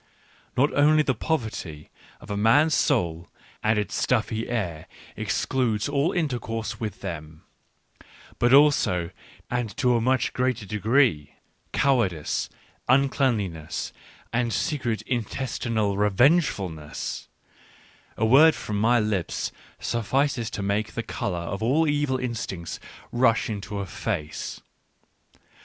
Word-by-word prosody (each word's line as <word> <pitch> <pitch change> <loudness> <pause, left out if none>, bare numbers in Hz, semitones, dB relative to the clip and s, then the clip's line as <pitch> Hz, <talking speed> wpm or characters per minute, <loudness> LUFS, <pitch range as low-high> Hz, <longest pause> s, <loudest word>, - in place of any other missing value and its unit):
Not 140 +4 +3
only 155 +2 +5
the 130 - +1
poverty 110 - -3 0.3
of - - -10
a - - -1
man's 120 +10 +4
soul 85 - +1 0.3
and 110 0 +2
its 105 -3 -2
stuffy 110 -2 0
air 90 -10 -3 0.3
excludes 120 -5 0
all 145 +3 +1
intercourse 120 -9 -2
with 110 -4 -5
them, 80 -1 -7 1.0
but 120 0 +3
also, 135 - +4 0.4
and 120 -3 -2
to 125 -3 +3
a 115 - +2
much 130 +1 +1
greater 125 -4 0
degree, 105 - +2 0.4
cowardice, 110 - +1 0.4
uncleanliness, 115 - +1 0.4
and 120 0 +1
secret 120 0 -1
intestinal 115 -3 -1
re 105 +1 +2
vengefulness; 100 - +1 0.9
a 110 - +2
word 145 +8 +7
from 105 -1 -3
my 120 +2 +4
lips 105 -5 -1 0.3
suffices 125 +1 0
to 100 - -4
make 100 +2 -1
the - - -3
colour 90 - -3
of 85 +4 -4
all 145 +8 +2
evil 145 -3 +1
instincts 115 -9 -4 0.3
rush 120 -2 +2
into 105 0 -5
a 100 - -2
face. 85 -4 -4
115 Hz, 115 wpm, -25 LUFS, 100-130 Hz, 1.0 s, word